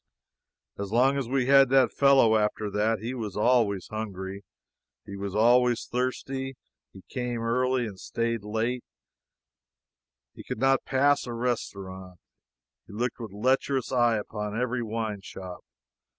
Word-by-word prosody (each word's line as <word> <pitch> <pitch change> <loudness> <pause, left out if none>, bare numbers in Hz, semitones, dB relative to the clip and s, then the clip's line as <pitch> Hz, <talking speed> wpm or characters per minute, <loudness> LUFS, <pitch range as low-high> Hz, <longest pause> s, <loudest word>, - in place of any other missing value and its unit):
As 100 -1 -4
long 130 +4 +4
as 135 -4 -2
we 130 -1 +1
had 135 0 +6
that 135 -1 +4
fellow 135 -5 +5
after 105 -1 0
that, 110 +3 +1
he 120 +3 -3
was 110 -6 -5
always 105 -4 +2
hungry; 100 -3 -5 0.6
he 100 - -8
was 100 0 -5
always 120 +2 +4
thirsty. 130 +2 -3 0.4
He 95 - -14
came 125 -2 -3
early; 125 +2 +1
he 100 - -8
stayed 115 +2 -2
late; 115 +4 -2 1.5
he - - -11
could - - -5
not 135 +2 +2
pass 140 +1 +2
a 120 - -4
restaurant; 95 -7 -4 0.7
he - - -12
looked 120 +4 -2
with 115 -4 -7
a 100 - -11
lecherous 130 +2 +1
eye 120 -3 +3
upon 105 +1 -4
every 125 0 -1
wine 110 -2 -3
shop. 95 -2 -9
115 Hz, 145 wpm, -27 LUFS, 105-125 Hz, 1.5 s, had